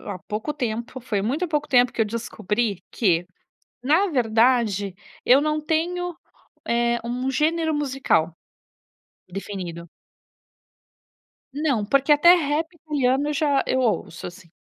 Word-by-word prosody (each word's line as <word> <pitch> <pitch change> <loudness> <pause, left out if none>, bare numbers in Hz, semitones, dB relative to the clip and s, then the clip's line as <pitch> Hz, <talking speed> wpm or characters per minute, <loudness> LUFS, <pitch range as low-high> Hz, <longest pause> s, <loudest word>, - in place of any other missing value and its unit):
A 195 -3 -6
pouco 215 +11 -4
tempo, 240 -2 -4
foi 215 -5 -2
muito 295 - -1
pouco 300 -1 -1
tempo 245 -1 +4
que - - -4
eu 225 - +5
descobri 215 -2 -2
que, 175 -6 +1 0.6
na 315 +10 +3
verdade, 225 - +2 0.3
eu 265 +3 +6
não 305 0 0
tenho, 345 +3 -2 0.5
eh, 235 0 +1
um 250 +2 -2
gênero 315 +3 +1
musical 265 - 0 0.9
definido. 180 -3 -7 1.6
Não, 275 -7 0
porque 275 +6 +3
até 340 +4 +7
rap 320 +1 -1
italiano 285 -3 0
eu - - 0
já 285 -1 +2
eu 260 - +1
ouço, 215 -8 -1
assim. 175 -1 -15
250 Hz, 125 wpm, -23 LUFS, 210-300 Hz, 1.6 s, até